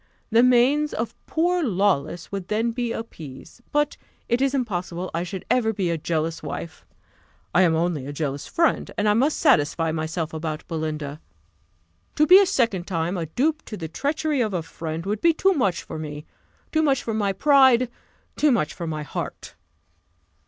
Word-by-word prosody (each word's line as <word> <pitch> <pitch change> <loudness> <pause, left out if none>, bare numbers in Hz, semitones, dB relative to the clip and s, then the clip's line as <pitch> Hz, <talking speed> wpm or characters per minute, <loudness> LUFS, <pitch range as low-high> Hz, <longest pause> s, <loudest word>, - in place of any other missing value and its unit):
The 225 +1 +6
manes 255 +5 +4
of 230 +1 -3
poor 350 +2 +1
Lawless 180 - 0
would 195 -2 -4
then 225 +2 0
be 240 0 -2
appeased. 165 - -8
But 295 0 +1 0.3
it 240 +1 +1
is 275 0 +2
impossible 185 -7 -3
I 165 - -1
should 180 +1 -6
ever 225 -3 +2
be 190 -4 -1
a 165 - 0
jealous 160 +1 -2
wife: 150 +2 -7 0.7
I 180 - +5
am 170 -3 +4
only 160 -5 -1
a - - -4
jealous 145 -1 -3
friend, 335 -1 +1
and 210 - +1
I 210 - +5
must 270 +8 +2
satisfy 165 - +3
myself 160 0 -3
about 155 -1 -4
Belinda. 155 -2 -4 0.9
To 305 - +4
be 365 +4 +9
a 395 - +3
second 230 - 0
time 170 0 -1
a 170 -3 -3
dupe 300 - 0
to 215 - -7
the 165 - -5
treachery 290 - -1
of 215 -5 -1
a 170 - -1
friend 160 +1 -6
would 210 +1 -2
be 335 - +5
too 385 +3 +3
much 200 - 0
for 160 - -7
me 150 0 -6 0.5
too 315 - +2
much 275 -4 +2
for 225 - -3
my 205 -2 +1
pride 260 +2 +5 0.5
too 300 -1 +3
much 155 -11 +1
for 170 - -6
my 155 -1 -3
heart." - - -6
195 Hz, 180 wpm, -24 LUFS, 160-255 Hz, 0.9 s, be